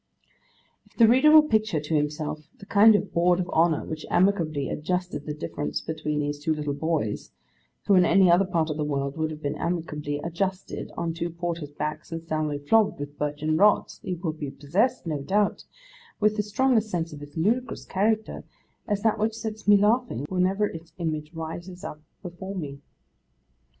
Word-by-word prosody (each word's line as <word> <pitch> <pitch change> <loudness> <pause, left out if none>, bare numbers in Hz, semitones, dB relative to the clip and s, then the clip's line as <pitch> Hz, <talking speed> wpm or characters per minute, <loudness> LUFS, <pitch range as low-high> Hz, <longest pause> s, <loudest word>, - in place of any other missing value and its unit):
If - - -29
the 230 - +7
reader 260 +6 +6
will 310 0 +9
picture 215 - +1
to 150 +2 -2
himself 150 0 -2
the 200 - -12
kind 210 +2 +6
of 205 -1 -1
Board 175 +1 +3
of 180 - -1
Honour 165 -1 +2
which 155 -1 -6
amicably 165 -7 +2
adjusted 180 -1 -3
the 150 - -2
difference 150 -1 -3
between 150 -2 -3
these 145 0 -3
two 155 +2 0
little 150 -1 -2
boys, 145 -8 -2 0.6
who 205 - +4
in 185 -1 +6
any 185 0 +5
other 180 +3 +5
part 165 -4 0
of 150 - -4
the 150 - -1
world 140 -1 -2
would 160 -1 -1
have 155 0 -8
been 145 +1 -2
amicably 150 -4 -3
adjusted 185 +3 -3
on 170 -1 -2
two 170 +1 -3
porters' 170 -2 -4
backs 150 +2 -4
and 165 0 -5
soundly 155 -2 -1
flogged 205 +9 +2
with 145 0 -7
birchen 150 +1 -1
rods, 205 +3 +3
he 185 - -3
will 165 -2 -3
be 150 -3 -5
possessed, 180 - 0
no 155 -4 -2
doubt, 200 +7 0 0.5
with 215 0 +2
as 210 0 -2
strong 260 +4 +2
a 220 - +5
sense 175 -7 -3
of 145 - -9
its 145 +2 -11
ludicrous 230 +8 0
character, 215 +3 0 0.4
as 205 -2 -1
that 220 -2 +2
which 220 +1 0
sets 220 -2 -6
me 205 0 +8
laughing 210 - +1
whenever 190 +3 +1
its 165 -4 -8
image 155 -3 -3
rises 170 +3 -7
up 150 - -7 0.2
before 190 +2 -7
me. 140 -6 -5
170 Hz, 185 wpm, -26 LUFS, 150-200 Hz, 0.6 s, will